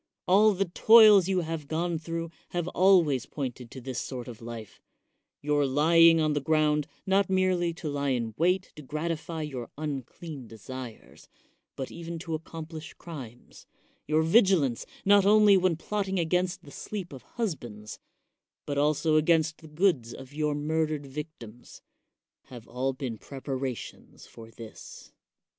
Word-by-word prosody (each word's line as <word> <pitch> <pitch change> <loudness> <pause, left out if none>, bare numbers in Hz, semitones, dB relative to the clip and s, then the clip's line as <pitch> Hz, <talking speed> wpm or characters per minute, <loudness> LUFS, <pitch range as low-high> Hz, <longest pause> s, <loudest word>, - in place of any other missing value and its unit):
All 205 +3 +5
the 195 +2 +1
toils 210 +1 +7
you 190 -2 +1
have 160 -3 -5
gone 165 +1 -1
through 165 +1 -5 0.2
have 175 -1 -2
always 175 -10 +3
pointed 125 -4 -5
to 130 - -9
this 130 0 -5
sort 125 -3 -6
of 120 -2 -10
life; 115 -2 -9 0.6
your 145 0 +2
lying 165 +4 +5
on 155 -1 +2
the 145 - -1
ground 150 0 +2 0.2
not 195 0 +2
merely 185 -2 +2
to 165 - -6
lie 145 -1 -1
in 115 -4 -1
wait 180 +5 +1
to - - -8
gratify 160 +2 -4
your 130 -6 -6
unclean 145 -1 -6
desires, 115 +2 -10 0.5
but 135 - -5
even 170 0 -6
to 165 0 -6
accomplish 160 0 -7
crimes; 130 -8 -11 0.4
your 155 +1 +2
vigilance, 165 - +3 0.2
not 200 0 +6
only 210 -1 +6
when 185 -2 +2
plotting 195 +3 -2
against 180 +2 0
the 140 - -13
sleep 190 -3 -6
of 130 - -9 0.2
husbands, 120 - -5 0.7
but 145 -1 -2
also 155 +2 +2
against 160 0 +2
tjie 155 -2 -15
goods 150 -10 +1
of 135 +1 -11
your 150 0 -1
murdered 155 0 -1
victims, 135 -5 -10 0.6
have 120 -3 -12
all 130 +3 -1
been 130 -4 -5
prepara 135 -2 -4
tions - - -12
for 115 -1 -13
this. 115 -1 -12
155 Hz, 150 wpm, -28 LUFS, 135-175 Hz, 0.7 s, toils